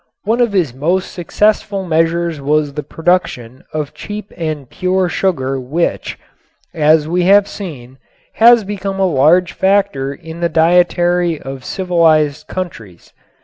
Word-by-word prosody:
One 230 +4 0
of 235 -3 +2
his 175 -10 0
most 170 +8 -1
successful 200 +2 0
measures 165 -1 0
was 150 0 0
the 150 - -4
production 145 -7 -2
of 150 -2 -4
cheap 210 -1 -8
and 155 -5 -4
pure 185 +5 0
sugar 135 -10 -1
which, 150 +7 -2 0.6
as 155 -1 +3
we 175 +2 0
have 200 +1 +5
seen, 135 -9 -9 0.3
has 235 0 +6
become 195 -1 -4
a 190 - +3
large 170 +3 +3
factor 190 -9 +1
in 160 +3 -10
the 170 0 0
dietary 175 0 +2
of 135 -1 -8
civilized 160 -4 +1
countries. 115 - -8
170 Hz, 135 wpm, -16 LUFS, 150-190 Hz, 0.6 s, has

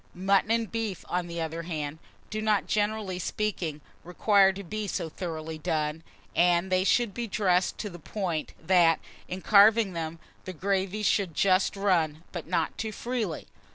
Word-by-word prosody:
MUTTON 195 +3 +2
AND 230 -2 +1
BEEF, 225 -5 -3
on 180 -1 -1
the 170 0 -5
other 165 0 -3
hand, 155 -3 -4 0.3
do 215 0 -2
not, 215 -2 +2
generally 210 -3 -1
speaking, 180 -7 -2 0.2
require 195 +2 +4
to 195 +1 -8
be 210 +3 -4
so 165 - -3
thoroughly 160 -2 -5
done, 150 0 -1 0.3
and 175 +1 +3
they 185 0 +3
should 230 +1 +2
be 240 +2 -3
dressed 185 -3 +1
to 215 - -4
the 175 -3 -9
point, 170 -2 -3
that, 165 -1 +4 0.3
in 185 +1 -5
carving 210 0 +6
them, 165 -1 -4 0.3
the 185 - -5
gravy 195 +3 -1
should 195 -6 +1
just 190 0 +3
run, 170 -6 +1
but 175 -4 -6
not 165 -2 0
too 220 -1 -2
freely. 225 -6 -3
185 Hz, 165 wpm, -28 LUFS, 165-205 Hz, 0.3 s, carving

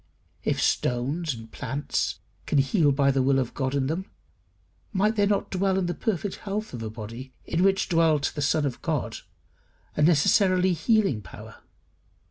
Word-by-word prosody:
If - - 0
stones 140 +5 0
and 115 -1 -11
plants 140 +2 -3 0.3
can 150 - +1
heal 145 +2 +3
by 140 0 +3
the 135 0 +1
will 135 +1 +3
of 130 -3 -1
God 130 0 -2
in 135 -2 +1
them, 165 +7 -3 0.8
might 210 +2 +1
there 205 -1 +3
not 205 -1 0
dwell 190 0 +1
in 190 - +1
the 175 - -1
perfect 205 -3 -2
health 210 -1 -4
of 120 - -5
a 110 - -4
body, 115 +4 -9
in 170 - -1
which 195 0 +3
dwelt 160 -4 +2
the 145 - -4
Son 145 +1 +2
of 130 -4 -4
God, - - -2 0.8
a - - -1
necessarily 180 +4 +4
healing 185 - +2
power? 85 - -12
155 Hz, 170 wpm, -26 LUFS, 135-190 Hz, 0.8 s, necessarily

